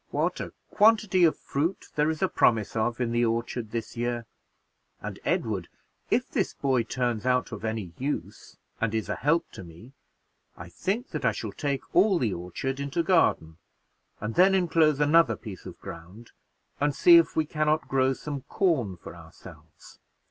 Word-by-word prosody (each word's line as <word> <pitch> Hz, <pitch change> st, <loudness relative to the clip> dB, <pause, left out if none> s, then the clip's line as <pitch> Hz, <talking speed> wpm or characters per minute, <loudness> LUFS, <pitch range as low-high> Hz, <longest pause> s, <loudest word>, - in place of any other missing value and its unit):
What -, -, -1 dB
a -, -, -5 dB, 0.2 s
quantity 210 Hz, -4 st, +4 dB
of 160 Hz, -, +2 dB
fruit 160 Hz, +7 st, -3 dB
there 150 Hz, +1 st, +1 dB
is 160 Hz, +3 st, -2 dB
a -, -, +4 dB
promise 115 Hz, -, +2 dB
of 115 Hz, +2 st, -1 dB
in 120 Hz, -2 st, -1 dB
the 120 Hz, 0 st, +1 dB
orchard 115 Hz, 0 st, -2 dB
this 115 Hz, +2 st, -5 dB
year! 120 Hz, 0 st, -2 dB, 0.7 s
And -, -, -7 dB
Edward, -, -, -1 dB, 0.4 s
if -, -, +1 dB
this -, -, -2 dB
boy 130 Hz, -3 st, +1 dB
turns 120 Hz, -2 st, -2 dB
out 125 Hz, 0 st, +1 dB
of 110 Hz, -2 st, -7 dB
any 110 Hz, -6 st, -3 dB
use, 140 Hz, +3 st, -5 dB, 0.2 s
and 115 Hz, -1 st, -1 dB
is 110 Hz, -, -2 dB
a -, -, -1 dB
help 165 Hz, +4 st, 0 dB
to -, -, -9 dB
me, 85 Hz, +10 st, -14 dB, 0.6 s
I 85 Hz, 0 st, -9 dB
think 195 Hz, -, -3 dB
that -, -, -5 dB
I -, -, +2 dB
shall -, -, -5 dB
take 140 Hz, -3 st, -2 dB
all 190 Hz, +1 st, +5 dB
the 115 Hz, -, 0 dB
orchard 90 Hz, +10 st, -4 dB
into 140 Hz, +4 st, -1 dB
garden, 125 Hz, -, +2 dB, 0.6 s
and 110 Hz, +2 st, -4 dB
then 190 Hz, +6 st, +5 dB
inclose 160 Hz, -5 st, +3 dB
another 150 Hz, -4 st, +4 dB
piece 100 Hz, -5 st, -10 dB
of -, -, -10 dB
ground, 90 Hz, +8 st, -11 dB, 0.5 s
and 145 Hz, 0 st, +1 dB
see 345 Hz, -1 st, +8 dB
if 335 Hz, -, +3 dB
we 160 Hz, -, +2 dB
can 155 Hz, 0 st, -1 dB
not 155 Hz, +1 st, +1 dB
grow 135 Hz, 0 st, +2 dB
some 140 Hz, +1 st, -6 dB
corn 130 Hz, -, 0 dB
for -, -, -11 dB
ourselves. -, -, -15 dB
130 Hz, 175 wpm, -27 LUFS, 115-160 Hz, 0.7 s, see